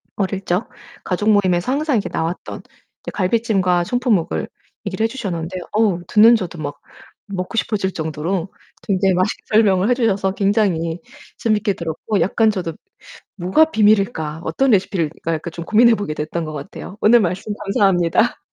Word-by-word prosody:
어릴 195 -1 -2
적 180 +5 -1 0.4
가족 200 +4 0
모임에서 190 0 +2
항상 290 -1 0
이렇게 205 - -2
나왔던 165 +2 -4 0.5
이 - - -3
갈비찜과 190 -3 +1
청포묵을 240 -7 0 0.4
얘기를 200 +2 -2
해 - - +3
주셨는데 185 -7 -4
어우 205 -5 +2
듣는 225 +3 +6
저도 180 -6 -4
막 145 -1 -5 0.5
먹고 190 +1 -5
싶어질 200 -4 -1
정도로 165 +4 -3 0.3
굉장히 190 -1 +1
맛있게 185 +4 -1
설명을 205 -2 +3
해 - - +5
주셔서 205 -6 +1
굉장히 195 -5 0 0.4
재밌게 215 -2 +1
들었고 170 +5 -3
약간 220 +3 +2
저도 175 -5 -4 0.6
'뭐가 190 - +3
비밀일까? 200 - +2
어떤 255 +13 +1
레시피일까?' 170 -5 0
약간 160 +1 -4
좀 170 0 -7
고민해 230 +1 +5
보게 205 -7 -4
됐던 155 +2 -4
것 155 - -6
같아요. 165 +6 -8
오늘 235 +3 +6
말씀 195 +1 -2
감사합니다. 195 +2 +2
195 Hz, 360 characters per minute, -19 LUFS, 175-215 Hz, 0.6 s, 듣는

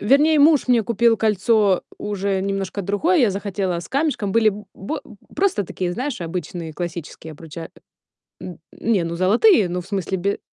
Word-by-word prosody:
Вернее, 295 +7 +4
муж 295 0 +5
мне 240 -2 +4
купил 235 +1 +2
кольцо 210 -2 +2 0.2
уже 200 -1 -2
немножко 195 0 -3
другое. 255 - +1
Я 240 -7 +4
захотела 195 -2 -2
с 170 - -9
камешком. 275 -8 -1
Были 225 0 +4
б 210 0 -4
бэ 195 - -5 0.4
просто 365 - +1
такие, 180 0 -3
знаешь, 260 +7 -4
обычные 170 -1 -5
классические 165 -1 -7
обруча 160 +1 -9
а, - - -26 0.4
н 180 -3 -8 0.2
не, 215 -6 0
ну, 165 0 -4
золотые, 205 - +4
ну, 180 +1 -3
в 175 - -14
смысле 195 -1 -2
бе 200 +3 -1
200 Hz, 170 wpm, -21 LUFS, 180-230 Hz, 0.4 s, муж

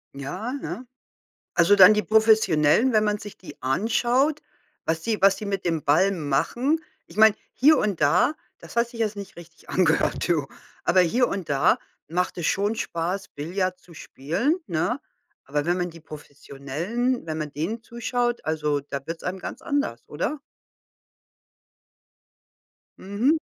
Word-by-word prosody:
Ja, 180 - -5
ne? 265 -2 -6 0.7
Also, 175 +4 +5
dann 195 +1 +9
die 210 - +1
Professionellen, 220 - +4
wenn 215 -1 +3
man 210 0 0
sich 205 0 -10
die 185 - -13
anschaut, 240 - +1 0.5
was 160 0 -1
sie 220 -2 -1
was 195 0 +5
sie - - -7
mit 195 -2 -3
dem 165 -3 0
Ball 180 +8 +4
machen. 195 - 0 0.3
Ich - - -16
meine, 220 -1 +7 0.2
hier 305 +4 +5
und 205 -5 -1
da, 165 - +3 0.2
das - - -13
hat 235 0 +2
sich 235 -1 -10
jetzt 215 -2 0
nicht 200 -1 -9
richtig 170 -1 -15
angehört, 170 -1 +1
du. 160 -5 +1 0.4
Aber 185 +1 +4
hier 235 +8 +2
und 195 -4 -4
da 140 -1 +3 0.3
macht 180 +3 -1
es 170 - -1
schon 205 +3 +1
Spaß, 185 0 -3
Billard 185 +5 -3
zu 180 - -18
spielen, 175 - -1
ne? 175 - -1 0.5
Aber 145 +2 -2
wenn 175 +1 +2
man 180 -1 -2
die 165 0 -13
Professionellen, 155 - -4
wenn 155 -1 -3
man 150 -2 -4
denen 185 +11 -3
zuschaut, 240 +1 -2
also, 150 -2 0
da 140 0 -6
wird's 165 0 -6
einem 185 +1 -3
ganz - - -7
anders, 285 - -2
oder? 275 - -3 2.6
Mhm. 230 +11 +1
185 Hz, 155 wpm, -24 LUFS, 160-225 Hz, 2.6 s, dann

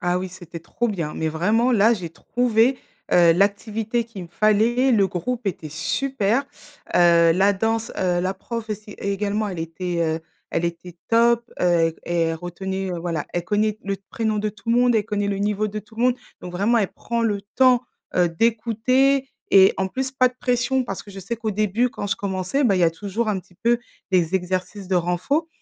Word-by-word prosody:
Ah 180 0 +1
oui, 185 0 -4
c'était 175 -2 -10
trop 240 +8 -2
bien, 170 -8 -3
mais 160 - -1
vraiment 215 +10 +2
là, 225 +1 +5
j'ai 180 -6 -6
trouvé, 245 +7 +1 0.3
heu, 170 -1 +6
l'activité 210 +5 0
qu'il 200 -6 -9
me - - -13
fallait, 225 +7 +3
le 200 -3 +4
groupe 235 +6 -4
était 165 -4 -3
super, 235 - 0 0.5
heu, 170 -1 +6
la 195 +4 +3
danse, 225 +3 -1
heu, 180 -1 +1
la 185 +2 -1
prof 230 -2 -6
aussi 210 0 -6
également, 205 +1 -1
elle 180 -3 -6
était, 170 +2 -3
heu, 160 0 -1 0.3
elle 170 - -1
était 170 +1 -7
top, 235 +1 +3
heu 170 -2 +3
et 175 - -4
et 170 - +1
elle 165 0 0
retenait, 190 +3 -4
heu, 175 - -3
voilà, 165 -3 -3
elle 175 -1 -2
connaît 215 +1 0
le 200 0 -2
d 195 - -32
prénom 220 -2 -1
de 215 +1 0
tout 220 +2 -6
le 235 - +4
monde, 245 -1 +4
elle 215 -2 +2
connaît 205 -2 -1
le 200 -1 -1
niveau 210 +1 0
de 215 - -5
tout 220 +2 -14
le 235 - -1
monde. 250 -1 +4 0.3
Donc 180 - -7
vraiment 205 +6 +2
elle 200 -4 -1
prend 235 0 -3
le 210 -3 0 0.2
temps, 255 -2 +5 0.3
heu, 180 -1 +3
d'écouter 235 +7 +2 0.2
et 190 -1 +7
en 190 0 0
plus 265 +6 -3
pas 255 -1 +4
de 250 - -16
pression 250 +1 +1
parce 195 -4 -5
que 205 - -13
je 195 0 -8
sais 230 +6 -4
qu'au 220 -1 -3
début, 215 +4 +1
quand 205 - -5
je - - 0
commençais 190 +7 -1
bah, 200 -5 +3
il - - +1
y - - +3
a 165 - +5
toujours 205 +6 -3
un 205 -2 0
petit 180 -1 -15
peu 235 +1 +3 0.3
des 180 -1 +2
exercices 185 +1 -2
de 190 - 0
renforcement, 180 - 0
205 Hz, 215 wpm, -23 LUFS, 180-230 Hz, 0.5 s, et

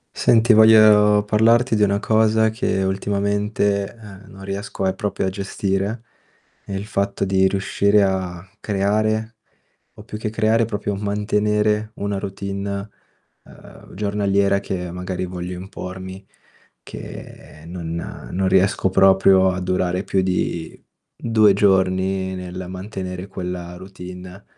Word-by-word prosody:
Senti, 115 0 +4
voglio 105 -1 +6
parlarti 115 +3 +3
di 105 - +3
una 100 0 +2
cosa 110 0 +3
che 110 -3 -1
ultimamente, 100 +1 -1
ehm, 105 -3 -13
non 95 0 -12
riesco 100 +1 -5
a 95 - +2
proprio 100 -2 -2
a - - +1
gestire, 100 +3 -3 0.6
è 100 - -7
il 95 +1 -4
fatto 100 -1 -2
di 95 0 +3
riuscire 100 +1 +2
a 95 -2 -2
creare, 110 +2 0 0.6
o - - -13
più 105 - -7
che 110 0 -3
creare, 110 +1 +2
proprio 105 -2 -3
mantenere 105 +1 0
una 100 0 -3
routine, 100 +1 -5 0.5
ehm, - - -15
giornaliera 100 -1 +1
che 90 -3 -4
magari 90 0 -4
voglio 90 0 -5
impormi, 95 0 -8 0.6
che 75 - -11
non 85 -1 -6 0.4
non 95 +1 0
riesco 95 +1 +2
proprio 95 0 +5
a 95 0 -3
durare 90 0 -1
più 95 - 0
di 90 -3 -2 0.4
2 110 -3 +3
giorni 95 -1 +1
nel 90 0 -7
mantenere 95 -1 -6
quella 90 -2 -6
routine. 90 0 -10
100 Hz, 125 wpm, -21 LUFS, 95-105 Hz, 0.6 s, voglio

